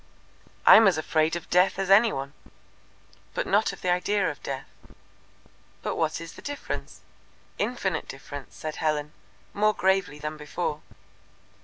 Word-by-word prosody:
"I - - +10
am 220 -1 +7
as 185 - +3
afraid 155 +1 +1
of 175 - -6
Death 185 +2 +4
as 195 0 -1
any 215 +3 +7
one." 135 +1 -5 1.0
"But - - -1
not - - +2
of - - -11
the 180 - +2
idea 185 0 +1
of 145 - -12
Death." 135 -1 -5 1.2
"But - - -2
what 160 -1 0
is 165 0 -8
the - - -12
difference?" 285 0 -6 0.6
"Infinite 200 -8 -1
difference," 140 0 -9
said 155 -1 -6
Helen, 150 -1 -1 0.4
more 215 +1 +2
gravely 190 -5 +1
than 150 +1 -5
before. 150 0 -3
165 Hz, 150 wpm, -26 LUFS, 150-195 Hz, 1.2 s, I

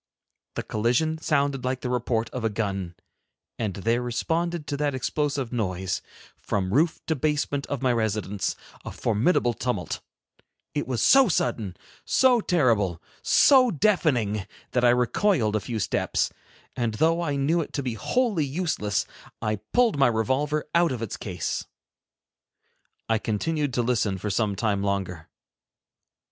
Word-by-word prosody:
The - - -2
collision 125 +9 0
sounded 140 -4 0
like 130 0 -2
the 125 - -3
report 120 -2 0
of 125 - -5
a 115 - +2
gun, 95 -4 -3 0.6
and 105 -5 -2
there 115 +5 0
responded 165 +7 -1
to 145 +1 -3
that 145 -2 0
explosive 140 -1 -1
noise, 95 -5 -2 0.4
from 95 -1 -2
roof 160 +6 +2
to 160 - 0
basement 145 -1 -1
of 140 -2 -4
my 125 -1 +3
residence, 105 -3 -1 0.3
a - - -6
formidable 120 - +1
tumult. 105 -10 -3 0.7
It 145 - -2
was 125 -3 -1
so 270 -2 +7
sudden, 110 - -1 0.3
so 255 -3 +4
terrible, 115 - +2 0.2
so 260 -3 +6
deafening, 135 - +1 0.2
that 125 - +1
I 120 - +6
recoiled 125 - +2
a - - +2
few 115 +3 -4
steps, 105 - 0 0.4
and 120 -3 -1
though 165 +7 +2
I 145 -4 -1
knew 150 +5 +2
it - - -6
to 140 - -2
be 125 -2 -2
wholly 205 - 0
useless, 140 - -1 0.3
I 110 -1 -1
pulled 235 -11 +3
my 135 - +6
revolver 130 +7 0
out 170 0 +4
of 120 -3 -3
its 110 - -4
case. 90 -5 -4 1.4
I 115 -1 +2
continued 145 +8 -1
to 120 - +2
listen 115 -5 +1
for 105 +3 -3
some 100 0 0
time 100 -1 0
longer. 95 -5 -2
125 Hz, 150 wpm, -25 LUFS, 105-150 Hz, 1.4 s, so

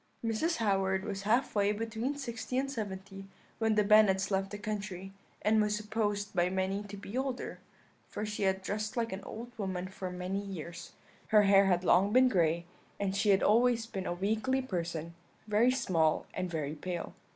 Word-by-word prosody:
"Mrs. 230 +10 +1
Howard 195 -3 +1
was 200 -2 -4
half 235 +6 +1
way 205 -1 +3
between 225 +6 -3
sixty 250 -2 -4
and 275 +1 0
seventy 195 -4 -6 0.3
when 225 -1 +2
the 210 - +4
Bennets 205 -2 +5
left 195 0 0
the 205 - -6
country, 205 -3 -5 0.3
and 215 +1 +4
was 210 0 +1
supposed 210 -1 -2
by 175 -1 +2
many 190 +2 -1
to 205 0 -8
be 200 +2 -8
older, 260 -1 -3 0.5
for 210 - -4
she 210 0 -4
had 190 -1 +1
dressed 215 +5 -3
like 230 -3 0
an 190 - -6
old 235 +2 -8
woman 185 -2 -2
for 190 0 -6
many 180 +2 -3
years; 175 -3 -7 0.3
her 215 -1 +6
hair 195 0 +6
had 180 -1 +2
long 190 +3 +4
been 255 +2 +6
gray, 170 -4 +1 0.3
and 195 -1 -1
she 205 +1 +1
had 195 -1 +4
always 230 +1 +4
been 195 -4 -5
a - - -1
weakly 220 +8 0
person, 170 -8 -3 0.3
very 215 +3 +3
small 180 -12 +1
and 185 - -3
very 155 -3 -3
pale. 175 +2 -5
200 Hz, 185 wpm, -31 LUFS, 190-220 Hz, 0.5 s, her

